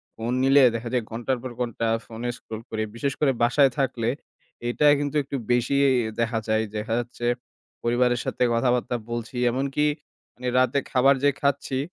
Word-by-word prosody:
Phone 115 +2 -3
নিলে 135 +1 +6
দেখা 115 +1 -4
যায় 125 -3 +1
ঘণ্টার 120 +3 -1
পর 130 - -5
ঘণ্টা 115 -1 -1 0.2
ফোনে 115 +2 -5
scroll 110 0 -8
করি। 110 0 -2
বিশেষ 135 +3 -1
করে 145 -3 +3
বাসায় 130 +3 +4
থাকলে 120 -3 0 0.6
এটা 135 +5 +1
কিন্তু 145 0 -3
একটু 140 +1 -6 0.2
বেশিই 135 +3 +3 0.3
দেখা 115 0 0
যায়। 110 0 +2
দেখা 110 +2 -3
যাচ্ছে 120 0 -6 0.6
পরিবারের 120 +1 +2
সাথে - - -1
কথাবার্তা 125 +1 +1 0.2
বলছি 120 +1 -5 0.2
এমনকি 135 +4 0 0.5
মানে 125 0 -6
রাতে 130 +2 +2
খাবার 135 +2 +5
যে 145 - +6
খাচ্ছি 140 -1 0
125 Hz, 160 wpm, -25 LUFS, 115-135 Hz, 0.6 s, নিলে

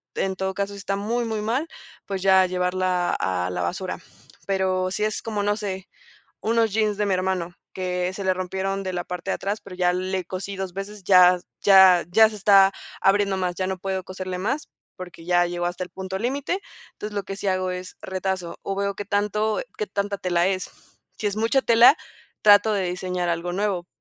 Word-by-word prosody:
en 190 0 -1
todo 190 0 -2
caso, 200 0 -2
si - - -9
está 195 0 -2
muy, 230 +4 -1
muy 220 -2 -2
mal, 245 +9 -1 0.4
pues, 195 -2 -3
ya 190 -1 +6
llevarla 180 0 0
a 90 -1 -1
la 90 0 -3
basura. 85 0 -3 0.5
Pero 185 -1 +1
sí 190 +3 -2
es 215 0 -1
como, 210 -3 -2
no 205 0 +1
sé, 190 -2 -5 0.5
unos 225 -1 +2
jeans 215 -2 +1
de 210 - +1
mi 195 - +2
hermano 185 -1 -2 0.2
que 180 -1 -2
se 195 +1 -5
le 185 0 +2
rompieron 190 +1 -3
de 185 -1 -4
la 175 - -2
parte 180 +1 -6
de - - 0
atrás, 205 +2 -3
pero 190 -2 -10
ya 180 -1 +2
le 185 0 -2
cosí 190 +2 -5
2 190 -2 -5
veces, 195 +1 -7
ya 180 -1 +6 0.2
ya 190 -3 +7
ya 220 +4 +6
se 215 - -9
está 195 -1 +6 0.3
abriendo 195 0 +3
más, 180 -1 -1
ya 185 - -2
no 190 0 -2
puedo 190 0 -3
coserle 185 0 -5
más, 255 +10 -2 0.3
porque 180 -2 -10
ya 175 0 +3
llegó 175 0 -3
hasta 175 +1 -2
el 180 - -9
punto 190 0 -5
límite. 275 - -2 0.3
Entonces, 210 0 -7
lo 200 - -1
que 195 - -6
sí 200 - -4
hago 185 -1 0
es 180 0 -7
retazo 190 -2 -3
o 195 - -3
veo 200 0 -1
qué 205 - -5
tanto 210 +1 0 0.2
qué 430 - -1
tanta 200 0 -2
tela 180 -1 +1
es. 185 -1 -2 0.5
Si 210 - -1
es 205 - -2
mucha 230 +5 +2
tela, 235 +5 +7 0.5
trato 210 +1 +6
de 195 -2 0
diseñar 180 -1 -2
algo 170 +1 -2
nuevo, 190 -2 -1
190 Hz, 205 wpm, -24 LUFS, 180-205 Hz, 0.5 s, ya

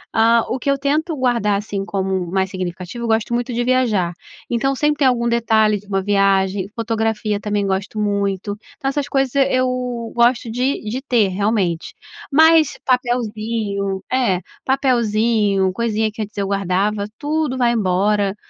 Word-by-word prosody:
Hã, 230 +1 +5
o 260 - -2
que 280 - -2
eu 275 - +2
tento 300 +4 0
guardar, 235 -6 +1
assim, 200 -1 -4
como 190 -2 -2
mais 190 0 0
significativo, 185 +4 -5
eu - - -2
gosto 225 +1 0
muito 245 +1 -1
de 240 0 -1
viajar. 235 -9 +1 0.3
Então, 270 +3 0
sempre 295 +3 +2
tem 295 -2 +2
algum 235 -2 +1
detalhe 220 -3 +2
de 205 - -19
uma 195 -1 0
viagem, 195 -1 +2
fotografia 220 -2 -1
também 205 -1 -1
gosto 195 +2 -2
muito, 200 -1 -1 0.2
então 270 - -2
essas 285 0 -2
coisas 270 -2 0 0.2
eu 255 0 +2 0.5
gosto 235 -1 +2
de 255 +4 -1
de 230 +5 -4
ter, 235 -8 +2
realmente. 190 -4 -1 0.4
Mas, 320 +1 +5
papelzinho, 220 -5 -1
é, 235 -9 +1 0.2
papelzinho, 220 -7 +2
coisinha 220 0 -1
que 220 +1 -7
antes 210 0 -6
eu 200 - 0
guardava, 200 +1 0
tudo 300 -3 -1
vai 240 -2 +3
embora, 200 -1 +1
220 Hz, 155 wpm, -19 LUFS, 200-250 Hz, 0.5 s, Hã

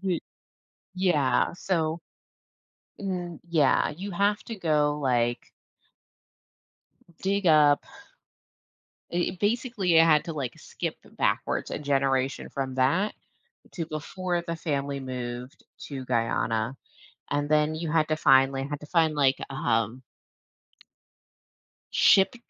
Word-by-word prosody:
Y 180 -3 +1 0.8
yeah, 150 -9 +2
so 165 -3 -1 1.0
mm, 180 -4 -4
yeah, 150 -5 +3
you 190 +7 -6
have 200 +3 +1
to 230 - -6
go, 150 -4 +1
like 120 -3 0 1.7
dig 200 0 0
up 150 -2 +5 1.3
a 175 +1 0
basically, 210 -3 0
you - - +9
had 155 -2 +4
to, 165 - -4
like, 130 -5 -3
skip - - -5
backwards - - -1
a - - -3
generation 135 -2 0
from 135 -1 -4
that, 155 +11 +2 0.6
to 165 -3 -4
before 170 +3 -3
the 170 - -2
family 140 -3 -2
moved 125 0 -6 0.2
to 135 -3 -6
Guyana, 115 0 0 0.5
and 145 0 0
then, 155 0 +2
you 160 -1 -3
had 155 -2 +2
to 155 - +2
find 135 -2 +5
they 135 0 -2
had 145 +1 -5
to 150 - -10
find, 160 -2 +2
like, 135 -2 +3
um 115 -2 0 1.9
ship 195 +3 +5
150 Hz, 115 wpm, -27 LUFS, 135-175 Hz, 1.9 s, you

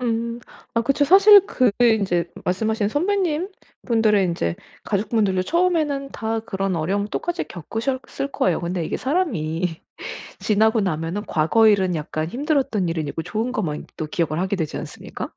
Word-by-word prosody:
음 235 -1 -1 0.4
아 230 - +3
그쵸. 275 +4 +2
사실 395 +4 +8
그게 240 -1 +3
인제 175 -5 -1
말씀하신 215 +3 0
선배님분들의 300 - 0
인제 125 - -1 0.3
가족분들도 200 -2 +1
처음에는 315 - +1
다 225 0 -2
그런 195 -4 -2
어려움을 195 +6 -1
똑같이 345 - -2
겪으셨을 260 - -4
거예요. 175 -3 +1
근데 175 0 -2
이게 - - -2
사람이 180 - -1 0.6
지나고 220 +1 +3
나면은 170 +2 -2
과거 195 +9 +3
일은 190 -4 +3
약간 155 +1 -3
힘들었던 255 - 0
일은 160 -3 -2
잊고 165 - -4
좋은 220 +8 -2
것만 155 -10 -3
또 155 - -3
기억을 155 0 -1
하게 190 +2 0
되지 160 -5 -3
않습니까? - - -7
215 Hz, 355 characters per minute, -22 LUFS, 175-260 Hz, 0.6 s, 사실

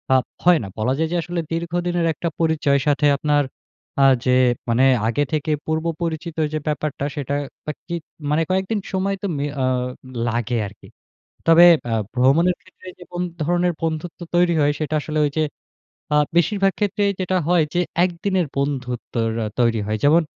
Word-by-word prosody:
আব 130 - +4 0.2
হয় 175 -1 +6
না। - - -6
বলা 115 +4 +1
যায় 160 +1 +1
যে - - 0
আসলে 175 +1 -3
দীর্ঘদিনের 175 +1 -1
একটা 170 - -4
পরিচয়ের 150 -4 +2
সাথে 145 0 +3
আপনার 145 0 +2 0.6
আ - - +7 0.2
যে 130 - +3 0.4
মানে 115 +3 +3 0.2
আগে 120 +6 +1
থেকে 155 0 0
পূর্ব 160 +1 -1 0.2
পরিচিত 165 0 -3 0.2
যে 155 - 0
ব্যাপারটা 150 -1 -2
সেটা 140 -1 -2 0.3
আরকি 160 +3 -7 0.4
মানে 150 +2 +2
কয়েকদিন 190 +3 0
সময় 195 +1 0
তো 200 - -2
মি 140 - -1 0.2
আ - - +2 0.6
লাগে 120 +1 -1
আরকি। 100 - -15 0.6
তবে 165 +1 +8 0.3
আ - - +1 0.2
ভ্রমণের 140 +8 +3
ক্ষেত্রে 185 0 -17
যে - - -10
কোন 175 0 -3 0.2
ধরনের 175 +2 +1
বন্ধুত্ব 165 +1 -3 0.2
তৈরি 175 0 +4
হয় 145 0 +4
সেটা 155 0 -1
আসলে 155 +1 -4
ঐযে 145 +2 -1 0.7
আ - - +5 0.2
বেশিরভাগ 195 +3 +3
ক্ষেত্রেই 205 0 +1
যেটা 185 0 0
হয় 175 -2 +4
যে 175 - +2 0.2
একদিনের 185 0 0
বন্ধুত্বর 125 -4 -2 0.2
অ - - -2
তৈরি 115 -2 +2
হয়। 110 0 -1
যেমন 160 +4 +5
160 Hz, 165 wpm, -21 LUFS, 140-175 Hz, 0.7 s, তবে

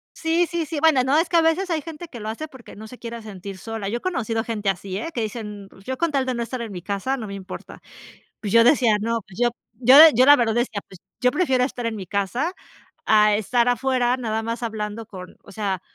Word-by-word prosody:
Sí, 335 +1 +1
sí, 340 -2 -2
sí, 305 0 -4
bueno, 305 -6 +4
no, 270 +3 +2
es 330 - 0
que 340 - +3
a - - +6
veces 325 +4 +1
hay 320 -3 0
gente 330 +1 -8
que 250 -7 -10
lo 215 0 -5
hace 270 +8 -5
porque 260 -5 -14
no 220 +1 -10
se 250 - -12
quiere 235 -1 -7
sentir 200 -2 -9
sola, 225 -3 -5
yo 230 - -1
he - - -10
conocido 230 - -2
gente 215 -4 -2
así, 190 0 -3
¿eh?, 280 +11 -4
que 235 - -2
dicen: 210 -2 -6
"Mm, - - -16
pues 195 0 -19
yo 260 0 -3
con 335 +1 0
tal 275 -2 0
de 255 - -1
no 235 - -3
estar 235 +1 -4
en 225 -3 -6
mi 180 -2 -7
casa 200 +8 -2
no 220 -5 -6
me 200 - -6
importa," 190 -1 -9 0.6
pues 205 - -4
yo 230 +1 +6
decía: 240 -4 +4
"No, 230 +1 -1
pues 190 +2 -14
yo 240 - +4 0.3
yo-" 275 +6 +9
yo 250 +3 +5
la 290 +1 +9
verdad 230 -4 +1
decía: 240 -4 -1
"Pues 190 - -14 0.2
yo 250 - +4
prefiero 265 -6 +1
estar 250 -2 -3
en 230 -1 -2
mi 195 - -6
casa 205 - -2 0.5
a 210 -1 +5
estar 235 +3 +1
afuera, 250 0 +1
nada 225 -3 -2
más 230 +1 -4
hablando 215 0 -4
con" 185 -4 -11
o 195 - -14
sea, 195 -3 -3
230 Hz, 260 wpm, -23 LUFS, 210-265 Hz, 0.6 s, yo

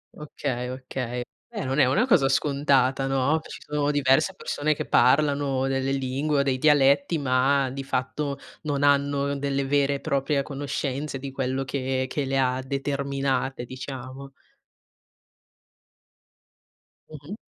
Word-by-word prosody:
Okay, 130 -4 -4
okay. 125 -1 -4 0.3
Eh, - - -5
non 135 +3 -1
è 135 - +6
una 135 - +2
cosa 150 - +4
scontata, 135 -2 +2
no? 135 +4 +1
Ci - - -10
sono 150 -1 -1
diverse 140 -2 +2
persone 155 +1 -1
che - - -4
parlano 140 +1 +3
delle 135 0 0
lingue 135 +2 0
o - - +3
dei 135 -2 0
dialetti, 150 +4 +4
ma 135 0 +2
di 135 +1 -5
fatto 140 +2 -2 0.3
non 145 -2 -1
hanno 140 0 +2
delle 140 0 -1
vere 140 0 +2
e - - -4
proprie 140 -1 0
conoscenze 140 0 -3
di 135 +1 -6
quello 130 0 -2
che 130 -1 -2
che 140 +2 -2
le 135 0 -1
ha 130 -1 +1
determinate, 135 -2 -2
diciamo. 130 +1 -8 2.8
Mh-mh. 155 +5 -9
135 Hz, 135 wpm, -25 LUFS, 130-145 Hz, 2.8 s, è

